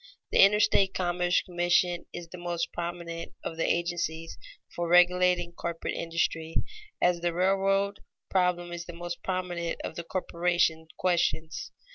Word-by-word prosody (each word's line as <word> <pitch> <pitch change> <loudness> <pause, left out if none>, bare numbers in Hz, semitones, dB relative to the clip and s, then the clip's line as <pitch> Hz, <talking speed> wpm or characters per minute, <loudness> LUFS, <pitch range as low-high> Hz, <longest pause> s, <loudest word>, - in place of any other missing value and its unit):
_ - - -28 0.3
The - - +2
Interstate 200 -1 +4
Commerce 175 -1 +1
Commission 175 0 +1
is 175 -1 -8
the 180 - -9
most 175 -1 -3
prominent 170 -1 -5
of 165 - -4
the 165 - +1
agencies 170 -1 -2 0.4
for 175 0 -1
regulating 180 0 +4
corporate 170 -1 -4
industry, 165 -1 -2 0.4
as 175 -1 +3
the 170 0 -1
railroad 195 +2 +2 0.3
problem 180 -2 +1
is 175 0 -5
the 175 - -7
most 175 0 -6
prominent 180 -2 -2
of - - -4
the 170 - -5
corporation 170 -2 0
questions. 170 -3 0
175 Hz, 140 wpm, -28 LUFS, 170-180 Hz, 0.4 s, Interstate